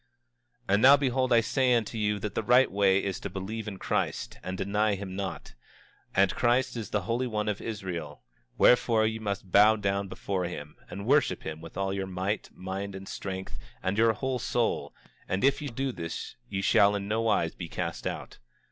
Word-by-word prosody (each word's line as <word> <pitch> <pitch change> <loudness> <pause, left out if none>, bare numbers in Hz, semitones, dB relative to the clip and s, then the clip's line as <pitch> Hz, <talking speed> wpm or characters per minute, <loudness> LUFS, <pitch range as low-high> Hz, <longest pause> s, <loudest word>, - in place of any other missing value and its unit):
25:29 95 - +1
And 100 - +4
now 140 +3 +9
behold, 130 -2 0
I 115 -1 +6
say 125 +2 +2
unto 115 0 -1
you 105 -1 0
that 105 +1 -4
the - - -1
right 125 +4 +4
way 100 0 +3
is 95 -2 -2
to 100 - -5
believe 100 +4 -5
in 100 -2 -5
Christ, - - -2
and 95 0 -5
deny 105 +2 +1
him 95 -1 -6
not; 95 -9 -5 0.6
and 95 0 +4
Christ 125 +2 +2
is 115 -3 -5
the 105 -3 -1
Holy 120 +5 -1
One 105 -2 -2
of 105 -2 -2
Israel; 90 -9 -5 0.3
wherefore 115 -2 +5
ye 110 0 -1
must 100 -3 -4
bow 105 +3 +7
down 100 -1 -1
before 95 -1 -3
him, 75 -4 -7
and 100 +3 -6
worship 135 -8 +2
him 80 0 -6
with 85 +1 -10
all 95 0 -1
your 95 -1 -3
might, 95 +3 -2
mind, 95 +1 -5
and 95 0 -8
strength, 95 -1 -6 0.2
and 95 +2 0
your 115 +1 +4
whole 130 +3 -2
soul; 120 -1 -1 0.3
and 95 - -1
if 140 +1 +3
ye 145 - -3
do 135 +1 -2
this 85 -7 -6
ye 100 -1 -2
shall 100 +1 +5
in 100 0 -3
nowise 110 -6 +1
be 85 -2 -7
cast 85 -1 -3
out. - - -6
100 Hz, 200 wpm, -28 LUFS, 95-115 Hz, 0.6 s, now